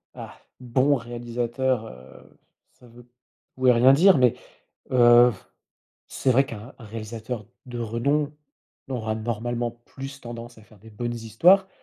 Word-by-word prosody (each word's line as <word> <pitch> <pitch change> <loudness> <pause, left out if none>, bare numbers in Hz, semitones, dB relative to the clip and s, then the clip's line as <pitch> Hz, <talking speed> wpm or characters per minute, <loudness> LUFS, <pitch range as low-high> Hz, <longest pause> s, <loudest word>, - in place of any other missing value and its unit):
Ah! - - -10 0.2
Bon 130 +3 +2
réalisateur, 120 0 -3
heu, 65 -5 -15 0.4
ça 125 - -20
veut 120 +1 -16
p 120 - -31 0.5
tout 130 0 +1
et - - +8
rien 125 +3 +6
dire 185 +5 +6
mais, 125 -3 +3 0.6
heu, 120 -1 +6
f 105 - -13 0.6
c'est 130 - 0
vrai 135 +3 +4
qu'un 115 +2 -10
un 115 - -11
réalisateur 110 +1 -7 0.2
de 125 -1 -7
renom 140 +6 -1 0.6
aura, 110 -4 -3
normalement, 120 +2 -3
plus 135 +4 -11
tendance 120 0 -9
à 110 - -16
faire 105 -1 -21
des 110 +3 -15
bonnes 120 +3 -4
histoires. 140 - +3
120 Hz, 150 wpm, -24 LUFS, 115-130 Hz, 0.6 s, et